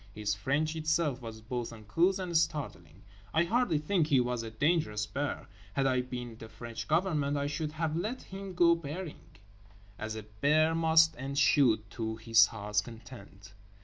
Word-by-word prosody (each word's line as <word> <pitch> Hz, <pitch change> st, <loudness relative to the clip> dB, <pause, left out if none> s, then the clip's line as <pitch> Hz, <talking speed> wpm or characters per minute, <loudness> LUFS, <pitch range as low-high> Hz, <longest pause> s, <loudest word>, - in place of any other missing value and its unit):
His 105 Hz, -1 st, -1 dB
French 145 Hz, +10 st, -1 dB
itself 155 Hz, -4 st, 0 dB
was 110 Hz, -2 st, -8 dB
both 120 Hz, +1 st, -4 dB
uncouth 140 Hz, -, +1 dB
and 180 Hz, -3 st, -4 dB
startling. 155 Hz, -3 st, -1 dB, 0.3 s
I 160 Hz, -, +5 dB
hardly 210 Hz, -3 st, +1 dB
think 155 Hz, +2 st, +1 dB
he 140 Hz, -4 st, +4 dB
was 125 Hz, -1 st, 0 dB
a 115 Hz, -, -6 dB
dangerous 110 Hz, -4 st, 0 dB
bear. 145 Hz, +5 st, -4 dB, 0.3 s
Had 135 Hz, +5 st, +1 dB
I 130 Hz, -1 st, +2 dB
been 125 Hz, -2 st, -6 dB
the 115 Hz, -, -9 dB
French 115 Hz, 0 st, -7 dB
Government 155 Hz, -4 st, +1 dB
I 140 Hz, -, -1 dB
should 150 Hz, +1 st, -3 dB
have 160 Hz, -1 st, -2 dB
let 215 Hz, +9 st, -3 dB
him 195 Hz, -1 st, -8 dB
go 170 Hz, -1 st, +6 dB
berrying, 165 Hz, +1 st, -8 dB, 0.6 s
as 110 Hz, 0 st, -4 dB
a 110 Hz, -, -6 dB
bear 145 Hz, +10 st, +2 dB
must 160 Hz, 0 st, +5 dB
and 135 Hz, +1 st, -4 dB
should, 115 Hz, -8 st, +4 dB
to 110 Hz, -1 st, -3 dB
his 115 Hz, -1 st, +5 dB
heart's 105 Hz, -1 st, -1 dB
content. 105 Hz, -3 st, -12 dB
140 Hz, 170 wpm, -31 LUFS, 115-160 Hz, 0.6 s, go